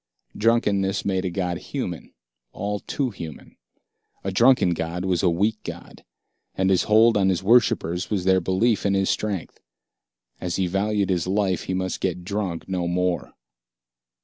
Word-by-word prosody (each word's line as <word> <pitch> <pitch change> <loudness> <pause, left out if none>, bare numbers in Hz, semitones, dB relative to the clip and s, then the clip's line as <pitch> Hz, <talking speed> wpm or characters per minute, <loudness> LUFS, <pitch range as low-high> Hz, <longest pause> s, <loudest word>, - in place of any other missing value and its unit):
Drunkenness 105 -4 +1
made 95 -1 0
a - - 0
god 90 0 -2
human, 90 - -5 0.4
all 105 0 -3
too 130 +3 -2
human. 80 -6 -9 0.7
A 95 - -2
drunken 120 -2 +4
god 85 +2 -3
was 90 -3 +1
a 90 - +3
weak 105 +6 0
god, - - -9 0.5
and 95 0 +1
his 95 - +2
hold 110 +2 +5
on 95 -2 +3
his 90 -1 0
worshippers 95 -6 +2
was 100 -4 -1
their 95 0 +3
belief 100 +6 +1
in 100 -1 +1
his 95 -1 +2
strength. 100 -5 -3 0.8
As 90 -2 -3
he 95 - +1
valued 100 +2 0
his 90 -2 0
life, 95 -2 0
he 95 - -2
must 95 0 -3
get 90 -1 -2
drunk 95 -3 -3
no 90 -2 -2
more. 90 0 -1
95 Hz, 160 wpm, -24 LUFS, 90-105 Hz, 0.8 s, hold